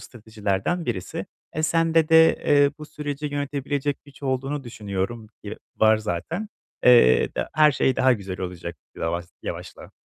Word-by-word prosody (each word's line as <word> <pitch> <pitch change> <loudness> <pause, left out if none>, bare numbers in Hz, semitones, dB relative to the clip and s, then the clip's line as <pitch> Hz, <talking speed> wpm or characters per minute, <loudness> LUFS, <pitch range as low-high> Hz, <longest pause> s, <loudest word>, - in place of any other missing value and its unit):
stratejilerden 110 - -3
birisi. 95 -7 -4 0.3
E, 155 - -2
sende 165 0 +2
de, 160 0 +6
eee, 145 -1 +5
bu 150 - -9
süreci 150 -1 -5
yönetebilecek 145 0 -3
güç 140 0 -18
olduğunu 135 +1 -2
düşünüyorum. 110 0 -4 0.2
Yı 105 0 -7 0.2
var 110 0 +5
zaten. 110 - -4 0.4
Eee, 120 - +6
da - - -3
her 155 -1 +5
şey 130 -1 +1
daha 130 0 +4
güzel 95 -4 -5
olacak 85 -2 -6 0.2
lavaz 85 +1 -3
yavaşla. - - -7
130 Hz, 145 wpm, -24 LUFS, 100-150 Hz, 0.4 s, de